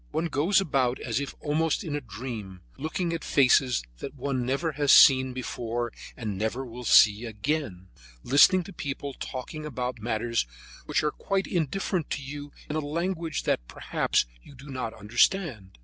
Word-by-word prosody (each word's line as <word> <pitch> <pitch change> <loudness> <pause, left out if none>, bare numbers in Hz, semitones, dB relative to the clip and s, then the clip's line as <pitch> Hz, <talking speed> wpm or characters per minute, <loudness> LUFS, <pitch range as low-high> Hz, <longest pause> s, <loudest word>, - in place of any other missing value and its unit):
One 170 - -1
goes 160 +8 +3
about 135 -8 +1
as 115 0 -2
if 140 - -5
almost 155 +3 0
in 155 -5 -3
a 145 - -2
dream, 105 -5 -7
looking 165 +3 -2
at 165 - -4
faces 130 - +3 0.2
that 140 - -7
one 130 -1 -2
never 140 +5 0
has 145 -1 +2
seen 130 -3 +7
before 120 -2 -3 0.2
and 105 -5 -4
never 115 +5 -2
will 125 0 -9
see 105 +1 +6
again; 110 - -3 0.4
listening 160 +8 +6
to 195 - -11
people 140 0 -5
talking 135 +5 -6
about 125 -4 -4
matters 115 - -1 0.4
which - - +1
are 150 - +1
quite 195 -1 -1
indifferent 175 0 -1
to 140 - -3
you 145 +1 -7 0.2
in 150 - -4
a - - +1
language 165 +1 -2
that - - 0
perhaps - - 0 0.2
you 140 - -15
do 140 +3 -11
not 125 -4 -4
understand. 115 - 0
135 Hz, 165 wpm, -27 LUFS, 120-155 Hz, 0.4 s, seen